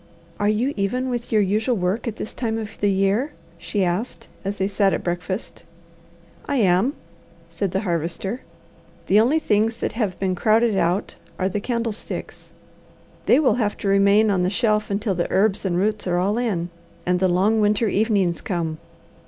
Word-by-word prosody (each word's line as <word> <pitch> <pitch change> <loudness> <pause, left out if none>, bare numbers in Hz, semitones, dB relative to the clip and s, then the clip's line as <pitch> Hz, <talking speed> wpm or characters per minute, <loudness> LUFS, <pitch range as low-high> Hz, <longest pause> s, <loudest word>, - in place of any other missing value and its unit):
"Are 205 - +2
you 240 +7 +1
even 250 +6 -1
with 240 -1 -4
your 215 -2 +4
usual 215 +6 +1
work 190 +5 -1
at 225 - -3
this 215 - -6
time 225 -2 -2
of 220 -1 -5
the 205 - +3
year?" 200 +9 +1 0.3
she 200 +3 -1
asked 180 +8 -3
as 200 +1 -3
they 190 - 0
sat 200 -1 +2
at - - -5
breakfast. 180 +4 -4 0.8
"I 285 - 0
am," 205 +3 +3 0.5
said 170 +4 -2
the 190 +2 -1
Harvester. 175 +5 -2 0.6
"The 205 - +4
only 250 +8 +3
things 225 -5 +1
that - - -2
have 215 -6 -2
been 190 -1 0
crowded 220 +4 +3
out 180 +2 0 0.2
are 185 - 0
the 195 +2 -2
candlesticks. 230 -1 -4 0.8
They 255 - +6
will 260 -7 +4
have 210 -1 -1
to - - -4
remain 200 +2 +4
on 185 -2 +1
the 180 - +2
shelf 215 0 +1
until 205 0 0
the 175 -1 -2
herbs 200 0 +2
and 175 -2 0
roots 205 +1 0
are 175 -1 +1
all 200 +6 +1
in, 180 -8 -1 0.3
and 180 0 +1
the 190 - +3
long 200 +5 +2
winter 210 +2 +2
evenings 200 -4 +1
come. 165 -5 -3
205 Hz, 180 wpm, -22 LUFS, 185-225 Hz, 0.8 s, They